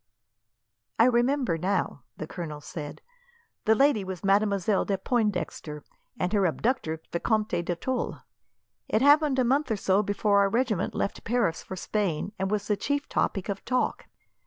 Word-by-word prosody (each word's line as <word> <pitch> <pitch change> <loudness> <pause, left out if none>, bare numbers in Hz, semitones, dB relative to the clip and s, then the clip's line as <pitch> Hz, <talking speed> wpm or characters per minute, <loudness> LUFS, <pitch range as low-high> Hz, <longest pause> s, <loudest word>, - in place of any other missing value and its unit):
"I 230 - +6
remember 245 - +2
now," 185 -6 -1 0.2
the - - -4
colonel 155 -2 -6
said. 145 +1 -8 0.6
"The 220 - +5
lady 270 -5 +3
was 185 -3 -6
Mademoiselle 200 0 +2
de 195 - -1
Pointdexter, 185 - -2 0.3
and 180 +3 -1
her 200 -3 +3
abductor 160 -4 -1
Vicomte 210 0 0
de 175 0 -2
Tulle. 255 +8 -3 0.7
It 220 - +2
happened 290 -1 +5
a 255 - +4
month 270 +4 +1
or 220 - 0
so 195 +1 +2
before 205 0 +2
our 200 0 +4
regiment 225 -4 0
left - - -2
Paris 225 -8 0
for 190 - -7
Spain, 195 -2 -2
and 190 0 0
was 210 0 -1
the 210 - +2
chief 285 +7 -2
topic 195 -3 0
of 200 -1 -4
talk. 255 -1 -1
205 Hz, 160 wpm, -27 LUFS, 180-240 Hz, 0.7 s, I